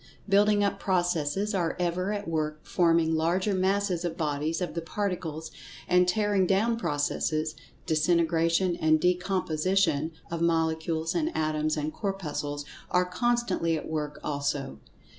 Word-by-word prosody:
Building 205 +1 +4
up 200 - 0
processes 175 +1 0
are 175 -4 0
ever 180 +2 0
at 205 -2 -3
work 155 -2 -2
forming 165 -2 +3
larger 175 +6 +1
masses 190 -1 +1
or 175 - 0
bodies 155 -1 -2
of 180 - -3
the 170 - -3
Particles—and 180 0 -2
tearing 205 -1 +2
down 215 +5 +2
processes, 155 -3 -1 0.3
disintegration 165 +2 +2
and 155 -2 +3
decomposition 180 -2 +1 0.2
of 170 -1 -3
Molecules 160 -1 0
and 320 -1 0
Atoms, 155 0 0
and 150 +1 -2
Corpuscles, 150 -8 -3 0.2
are 180 0 +3
constantly 180 -4 0
at - - -6
work 150 -2 -3
also. 140 - -2
170 Hz, 125 wpm, -28 LUFS, 155-190 Hz, 0.3 s, Building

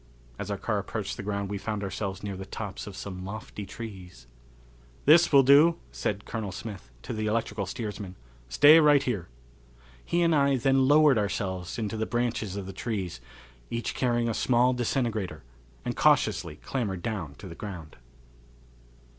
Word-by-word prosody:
As - - -4
our - - -2
car - - -1
approached - - -4
the - - -6
ground 100 -1 -3
we 100 - -3
found 105 0 -3
ourselves 95 0 -4
near 100 -2 -4
the 95 - -6
tops 100 +1 -6
of 100 -2 -8
some 95 -2 -6
lofty 100 0 -7
trees. 95 - -9 0.8
"This 165 +4 +6
will 140 -2 +7
do," 145 +5 +6
said 100 - -3
Colonel 110 -4 -4
Smith, 100 - -8
to - - -5
the 110 0 -2
electrical 105 -3 -1
steersman. 105 -3 -5 0.3
"Stay 145 - +8
right 145 -3 +5
here." 105 -10 -2 0.8
He 175 0 +1
and 165 -1 +3
I 140 -2 +3
then 135 0 +3
lowered 145 -4 +6
ourselves 95 -3 -3
into 110 -1 -3
the 110 - -1
branches 120 -5 -1
of 100 -2 -4
the 95 - -7
trees, 95 - -4 0.5
each 115 0 -3
carrying 120 -2 +1
a 115 - 0
small 125 +2 +3
disintegrator, 110 - -2 0.4
and - - -2
cautiously 75 - +2
clambered 100 - -3
down 95 -11 -4
to 100 - -10
the 85 - -8
ground. 85 -5 -8
105 Hz, 165 wpm, -28 LUFS, 95-125 Hz, 0.8 s, Stay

